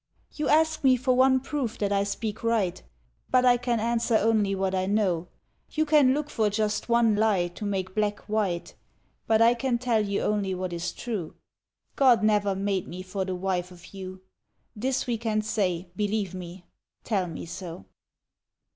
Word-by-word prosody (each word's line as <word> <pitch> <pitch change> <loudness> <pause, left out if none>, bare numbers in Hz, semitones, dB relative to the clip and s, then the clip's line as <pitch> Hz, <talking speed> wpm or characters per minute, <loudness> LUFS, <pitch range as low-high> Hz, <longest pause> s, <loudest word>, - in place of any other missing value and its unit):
^^ - - -16
You 300 - 0
ask 315 0 +3
me 260 -1 +5
for 255 +1 +1
one 260 +1 +5
proof 265 -4 -3
that 205 -1 -1
I 200 0 +2
speak 215 +2 -4
right, 220 -6 0 0.5
But 255 0 +4
I 245 -1 +6
can 240 -1 -1
answer 230 0 +1
only 215 -2 +2
what 190 0 -1
I 185 0 0
know; 190 -5 +1 0.4
You 310 0 0
look 295 -1 +3
for 215 -2 +1
just 210 +1 -1
one 235 -2 +4
lie 205 -5 +2
to 175 +4 -8
make 190 -2 -2
black 210 0 -1
white, 195 -5 -1 0.5
But 225 0 +4
I 235 +1 +6
can 245 0 0
tell 235 -3 +1
you 200 -1 -1
only 200 -3 0
what 185 -1 -4
is 170 +1 -3
true 210 -10 -5 0.3
— - - -50
God 245 -5 +6
never 205 -2 +2
made 195 -1 -1
me 180 +2 -7
for 190 +1 -3
the 185 -1 -3
wife 180 -1 -2
of 175 0 -15
you. 185 -1 -8 0.5
This 255 +4 -1
we 235 -3 -2
can 215 -2 0
say, 190 -5 -1
— - - -38
believe 205 -2 -1
me!... 180 0 -8 0.4
Tell 195 -5 0
mc 165 -1 -7
so!" 170 - -8
210 Hz, 185 wpm, -26 LUFS, 185-235 Hz, 0.5 s, I